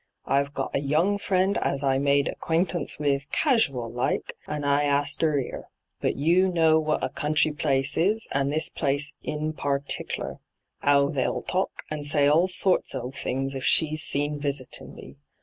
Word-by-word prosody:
I've 140 +1 0
got 135 - -3
a - - +1
young 165 +8 +1
friend 190 0 +1
as 140 +1 -1
I 135 -1 +2
made 140 0 +2
acquaintance 170 -1 -1
with 140 -1 -1
casual 145 - +2
like, 120 +2 -2
and 150 -1 -4
I 140 0 +3
asked 145 0 0
'er 155 -2 +2
'ere. 130 - -6 0.3
But - - 0
you 170 +6 +3
know 160 -2 +4
what 155 -3 -1
a 130 - 0
country 150 +3 +1
place 135 -2 0
is, 210 +7 +1
and 140 0 0
this 155 +2 +1
place 145 +2 -1
in 155 +1 -3
partickler 140 -2 -3 0.2
— - - -50
'ow 140 0 +4
they'll 135 -4 -1
talk, 185 +1 -2
and 150 -1 -4
say 145 0 +3
all 160 +5 +4
sorts 185 -4 +1
of 125 0 -5
things, 135 0 -3
if 135 -1 -5
she's 155 -1 +3
seen 145 0 -1
visitin' 140 -2 -4
me. - - -12
145 Hz, 175 wpm, -26 LUFS, 140-160 Hz, 0.3 s, know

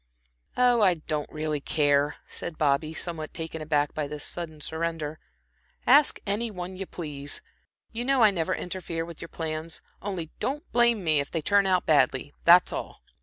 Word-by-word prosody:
"Oh, 245 -2 +4
I 185 -4 +5
don't 155 -2 -4
really 155 -1 -2
care," 145 0 +2
said 165 -2 -6
Bobby, 150 +1 +2
somewhat 160 -1 -3
taken 160 -1 -5
aback 150 -1 +1
by 150 -2 -2
this 150 0 -5
sudden 160 -3 -5
surrender. 160 0 -3 0.7
"Ask 285 +3 +5
any 215 +3 -1
one 185 -2 -6
you 190 0 -6
please. 145 -4 -5 0.5
You 235 +1 -3
know 265 -1 +3
I 215 - +7
never 185 0 0
interfere 170 -2 -4
with 170 -2 -10
your 170 - -7
plans. 160 0 -4 0.2
Only 180 -5 -4
don't 290 +4 -2
blame 235 -4 +3
me 155 -3 +3
if 140 - -2
they 165 -3 -3
turn 200 +2 +4
out 185 -1 +2
badly 145 -2 +2
that's 175 +1 +7
all." - - -6
165 Hz, 170 wpm, -27 LUFS, 155-190 Hz, 0.7 s, I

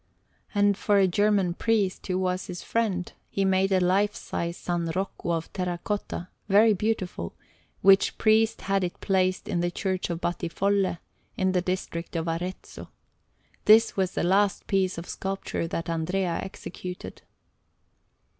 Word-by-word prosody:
And 205 0 +4
for 205 +1 +2
a 195 -1 +5
German 200 -1 +2
priest, 205 -1 0
who 185 -1 0
was 185 0 -1
his 180 -1 -6
friend, 200 -6 -1 0.2
he 195 - 0
made 190 0 +2
a 190 - +4
lifesize 185 -1 0 0.2
S. 170 -2 -1
Rocco 190 -2 -3
of 165 -1 -2
terra 180 -2 -2
cotta, 200 -3 -3 0.2
very 215 +3 +6
beautiful; 185 - -2 0.5
which 195 0 +5
priest 220 0 +3
had 195 -1 0
it 175 - -4
placed 185 -1 +1
in 175 - -1
the 175 0 +1
Church 185 +1 -2
of 170 -1 -2
Battifolle, 185 +2 0 0.4
in 190 0 +2
the 180 -1 +1
district 180 -2 -4
of 165 0 -1
Arezzo. 175 +3 -5 0.8
This 220 +2 +6
was 190 -2 0
the - - -1
last 195 +3 +2
piece 190 -2 +1
of 170 - -5
sculpture 195 -3 -3
that 165 0 -3
Andrea 170 +2 -1
executed. 180 -1 -8
185 Hz, 145 wpm, -26 LUFS, 175-200 Hz, 0.8 s, very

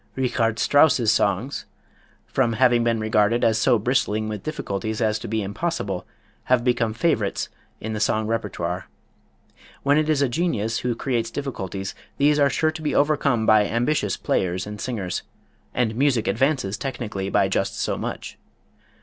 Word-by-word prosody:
Richard 120 -3 0
Strauss's 135 -5 +4
songs, 115 +6 0 0.6
from 120 -4 +1
having 120 +1 +4
been 115 -1 +1
regarded 110 +1 +2
as 110 -1 +3
so 120 +1 +4
bristling 110 -2 0
with 105 -2 -4
difficulties 110 -7 -3
as 110 -1 +1
to - - -7
be 110 0 -1
impossible, 100 - -3 0.4
have 125 -2 +3
become 120 -3 +1
favorites 115 -7 0 0.3
in 110 0 -4
the 105 - -3
song 110 +1 +1
repertoire. 95 -5 -3 1.0
When 145 +2 +4
it 155 0 0
is 145 -2 +3
a - - +3
genius 120 - -1
who 120 -1 -1
creates 120 -2 -1
difficulties 95 -9 -4 0.2
these 145 +1 +3
are 140 -1 +5
sure 155 +4 +1
to 155 0 -8
be 150 - -1
overcome 140 -6 +2
by 110 -2 +5
ambitious 120 -4 0
players 95 0 -1
and 105 0 -7
singers, 100 -8 -3 0.5
and 110 -3 0
music 130 -3 +2
advances 130 -5 0
technically 105 -8 -4
by 100 - +3
just 95 0 -1
so - - 0
much. - - -6
115 Hz, 160 wpm, -23 LUFS, 105-135 Hz, 1.0 s, are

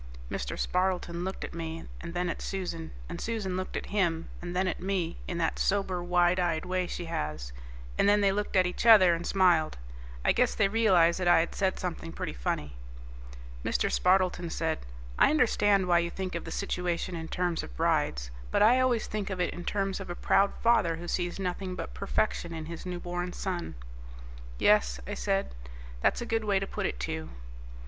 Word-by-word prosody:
Mr. - - -3
Spardleton 180 -2 0
looked 190 +1 -4
at - - -6
me 165 -1 -5
and 170 +1 -7
then 180 0 0
at 170 - -3
Susan, 170 -4 -4 0.2
and 170 0 -6
Susan 215 -5 -2
looked 185 0 -3
at - - -4
him 170 -5 +1
and 175 0 -5
then 185 +1 +1
at - - -2
me 180 -3 -2
in 175 - -3
that 165 -1 0
sober 190 -3 +1
wide 175 +1 +3
eyed 170 -2 0
way 180 0 -1
she 175 - -5
has, 75 - -4 0.5
and 200 - +5
then 205 0 +5
they 200 -1 +4
looked 205 +1 -2
at 185 -1 +5
each 180 +6 -2
other 190 -6 +8
and 170 +1 -3
smiled. 175 -5 +3 0.5
I - - +5
guess 250 0 +2
they 200 - +3
realized 190 -6 +4
that 180 - 0
I 175 -1 +7
had 165 - -3
said 190 -1 0
something 165 -2 -4
pretty - - -4
funny. 65 +2 -3 0.9
Mr. - - 0
Spardleton 180 -2 +2
said, 160 -1 -1 0.4
"I - - +7
understand 205 -9 +3
why 175 -1 +5
you 170 0 -1
think 185 +1 -5
of 170 - -4
the - - -6
situation 180 -2 -2
in 160 -1 -5
terms 175 -1 -1
of - - -10
brides, - - 0 0.2
but - - +3
I 240 +4 +6
always 250 -3 +2
think 210 -2 -3
of 190 -2 -4
it 180 - 0
in 175 - -7
terms 195 +1 -1
of 195 - -7
a 175 - -4
proud 200 +2 +3
father 215 -8 +4
who 170 +2 -8
sees 175 0 -1
nothing 185 0 -3
but - - -6
perfection 195 -3 -1
in 160 -1 -5
his 170 +2 -7
newborn 175 0 -4
son." 180 -3 -4 0.8
"Yes," 60 0 +3
I - - -5
said, 195 - -1 0.5
"that's - - +2
a - - -3
good 225 -1 0
way 205 -2 +2
to 195 - -1
put - - -2
it, 60 - -5
too." 80 +5 -4
180 Hz, 200 wpm, -29 LUFS, 170-195 Hz, 0.9 s, other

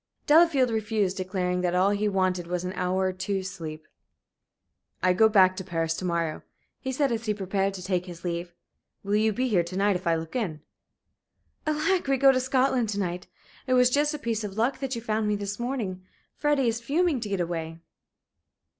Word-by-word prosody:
Delafield 295 -5 +5
refused, 215 -3 0
declaring 185 -1 -1
that 180 0 0
all 190 +2 +3
he 205 +1 0
wanted 185 -3 0
was 180 0 -2
an 185 +1 -4
hour 185 +1 -1
or - - -4
two's 190 0 -3
sleep. 155 -4 -8 1.2
"I 185 0 +4
go 220 +4 +5
back 190 -3 +5
to 190 - -4
Paris 165 -3 -1
to 185 - -4
morrow," 170 -3 -1 0.4
he 260 - -4
said, 275 0 +1
as 230 -1 -3
he 210 - +1
prepared 195 0 -1
to 180 - -7
take 180 -1 -1
his 175 -1 -10
leave. 175 0 -3 0.5
"Will 200 +1 -2
you 220 +1 +3
be 255 +5 -1
here 200 -7 +3
to 175 +2 -6
night 200 0 +3
if 180 -1 -4
I 165 - +3
look 160 +4 -6
in?" 175 -11 -2 1.1
"Alack! 310 +3 +1
we 270 0 +2
go 270 +1 +6
to 255 - +1
Scotland 255 -2 +1
to 205 -1 -2
night! 180 -1 -3 0.4
It 255 - +3
was 250 0 +5
just 295 +3 +2
a - - -3
piece 230 -5 -2
of 205 -1 -6
luck 240 +5 +1
that 265 -2 -3
you 230 - -6
found 215 -1 0
me 210 - +1
this 205 +1 -4
morning. 230 -7 -3 0.3
Freddie 295 -4 +1
is 230 +1 -1
fuming 300 +3 +1
to 215 -3 -5
get 195 -2 -1
away." 165 -2 -3
200 Hz, 210 wpm, -26 LUFS, 180-250 Hz, 1.2 s, go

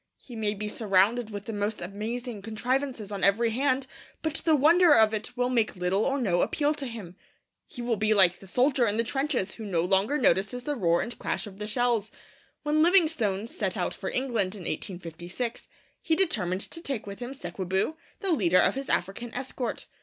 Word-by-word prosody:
He 245 - -12
may 215 -2 -1
be 210 +1 -4
surrounded 210 +2 +2
with 205 -1 -7
the 225 - -5
most 205 +1 -2
amazing 215 +4 -5
contrivances 240 +1 -2
on 200 -2 -4
every 225 +4 +4
hand, 260 +2 +1 0.4
but 315 -1 -1
the 320 -2 +3
wonder 325 +3 +6
of 220 -1 +5
it 220 +4 -4
will 250 0 +1
make 230 -4 +1
little 180 +3 0
or 275 +1 0
no 180 -8 +1
appeal 295 0 +1
to 280 -3 -5
him. 210 -7 -8 0.5
He 245 - -7
will 235 -2 0
be 215 +1 +1
like 185 -4 +5
the 195 - -13
soldier 250 +3 +2
in 205 +1 0
the 230 - +3
trenches 270 -5 -1
who 225 - -9
no 180 -5 0
longer 195 +10 +2
notices 225 -1 +1
the 295 +2 -2
roar 170 -7 +2
and 240 - -7
crash - - -2
of 200 -1 -11
the 210 - -4
shells. 235 -2 0 0.5
When 300 +1 +2
Livingstone 315 - +3
set 320 +11 -3
out - - -1
for - - -5
England 230 -7 -1
in 200 - -9
1856, 175 +6 -5 0.3
he 320 - +1
determined 190 - 0
to 335 - -4
take 275 -9 -4
with 200 -1 -8
him 250 +2 -6
Sekwebu, 190 - -2 0.3
the 390 -3 0
leader 185 - +3
of - - +4
his 270 0 -5
African 200 +6 -1
escort. 255 -1 -4
225 Hz, 200 wpm, -27 LUFS, 195-265 Hz, 0.5 s, wonder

